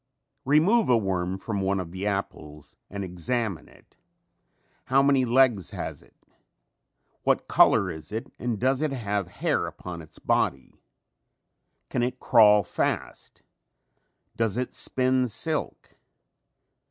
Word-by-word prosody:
Remove 165 - +4
a 120 - +5
worm 95 -3 -1
from 100 0 -3
one 95 0 0
of 85 -2 -6
the 95 +3 -4
apples 75 -7 -5
and 100 0 -5
examine 95 +2 -3
it. - - -23 0.9
How 135 +1 +3
many 140 -2 +3
legs 120 -6 +3
has - - -6
it? - - -24 1.1
What - - +1
color - - +4
is 80 +2 -10
it 110 +2 -5
and 120 -2 -2
does 130 +2 +1
it 155 -2 0
have 105 -7 -2
hair - - -1
upon 90 -2 -8
its 75 - -15
body? 65 -1 -1 1.2
Can 125 - 0
it 125 +1 -2
crawl 105 -2 +6
fast? 90 - -4 0.9
Does 115 -1 0
it 125 0 -2
spin 130 0 +1
silk? 155 +7 -4
110 Hz, 130 wpm, -26 LUFS, 95-130 Hz, 1.2 s, crawl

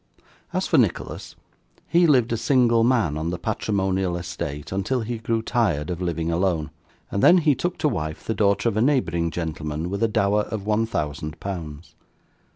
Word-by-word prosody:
As - - -1
for - - +3
Nicholas, - - -1 0.5
he 170 0 +4
lived 125 -6 +3
a - - +2
single 120 -1 +3
man 115 - +2
on 80 +2 -2
the 90 - -3
patrimonial 95 -2 -1
estate 80 -5 -5
until 100 +7 -1
he 115 +1 -4
grew 115 0 -1
tired 95 - 0
of 90 0 -4
living 85 -2 -1
alone, 85 -3 0 0.4
and 100 - -1
then 180 - +7
he 155 -4 +4
took 175 +6 -3
to 155 -1 +1
wife 80 - -3
the 110 - -1
daughter 100 0 +2
of 115 - 0
a - - +3
neighbouring 85 - +1
gentleman 80 0 -4
with 100 - -3
a 115 - +4
dower 105 -1 +2
of 105 -2 -5
one 110 +1 +1
thousand 75 -5 -4
pounds. 85 -5 -6
100 Hz, 180 wpm, -24 LUFS, 85-115 Hz, 0.5 s, then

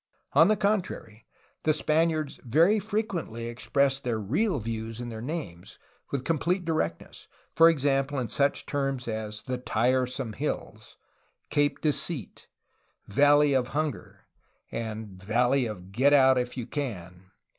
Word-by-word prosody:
On - - +7
the 215 - +4
contrary, 185 - -2 0.3
the 155 -1 +2
Spaniards 155 -1 0
very 165 - +4
frequently 195 - -3
expressed 135 +3 0
their 120 -3 -1
real 150 - 0
views 115 0 -5
in 120 -1 -5
their 110 -1 -7
names, 125 - -6 0.3
with 135 -2 -3
complete 175 +3 0
directness, 85 - -3
— - - -36
for 165 0 +8
example, 140 -2 +1
in 125 -3 -1
such 140 +5 0
terms 135 -3 -2
as 110 -1 -4
^'The 125 -2 -4
Tiresome 125 +1 0
Hills," 110 -5 -5 0.5
"Cape 145 0 +1
Deceit," 150 - -2 0.6
^'Valley 145 +3 +5
of 125 -2 +1
Hunger," 150 - -3 0.5
and 110 -4 -5
''Valley 120 +5 +1
of 95 -3 -9
Get 135 +7 +3
out 130 -2 +6
if 125 +1 -4
you 120 - -3
can." 95 - -6
130 Hz, 135 wpm, -27 LUFS, 110-150 Hz, 0.6 s, for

